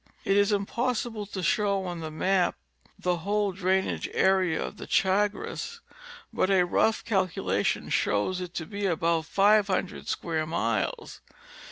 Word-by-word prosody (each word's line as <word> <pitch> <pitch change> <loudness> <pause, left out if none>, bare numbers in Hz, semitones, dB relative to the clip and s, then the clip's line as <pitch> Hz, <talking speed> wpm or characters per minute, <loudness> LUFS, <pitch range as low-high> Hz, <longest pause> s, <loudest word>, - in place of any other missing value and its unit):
It 195 - +2
is 205 +1 +4
impossible 220 +1 -1
to 190 -2 -5
show 200 0 +1
on 175 -2 -4
the 160 -1 -5
map 180 +4 +1 0.4
the 180 -1 0
whole 205 +3 0
drain 190 +1 +1
age - - -3
area 190 -4 +2
of - - -8
the - - -8
Chagres, 210 - 0 0.5
but 185 - +1
a 190 -2 +4
rough 220 +5 +1
calculation 190 -5 0
shows 140 - 0
it 180 -1 -7
to 160 - -3
be 200 +1 -3
about 165 -2 +1
500 200 -1 +2
square 160 -2 -2
miles. 115 -9 -2
190 Hz, 145 wpm, -27 LUFS, 175-205 Hz, 0.5 s, is